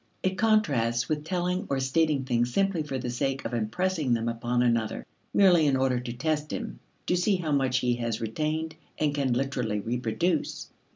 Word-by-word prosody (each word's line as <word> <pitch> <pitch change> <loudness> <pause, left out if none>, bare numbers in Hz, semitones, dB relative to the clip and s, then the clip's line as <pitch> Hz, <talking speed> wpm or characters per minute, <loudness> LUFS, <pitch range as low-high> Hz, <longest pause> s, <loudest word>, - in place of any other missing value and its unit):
It 190 0 +1
contrasts 140 - +2
with 150 -1 -1
telling 180 +3 -1
or 140 - 0
stating 140 +1 +1
things 120 -1 0
simply 195 +1 +1
for 145 -3 -3
the 125 -1 -3
sake 135 +2 -2
of - - -3
impressing 130 +6 0
them 115 0 -2
upon 120 +1 0
another, 115 -3 0 0.3
merely 175 -6 +5
in 135 -2 +3
order 130 -1 +1
to 120 -1 -5
test 150 +3 -1
him - - -5 0.3
to 180 - +1
see 185 +3 +2
how 170 -4 -2
much 135 -3 +2
he 125 -1 +2
has 115 -2 -2
retained 155 +8 -2 0.2
and 150 -2 +1
can 140 -4 +1
literally 125 -5 -1
reproduce. 125 - -1
135 Hz, 180 wpm, -27 LUFS, 120-160 Hz, 0.3 s, merely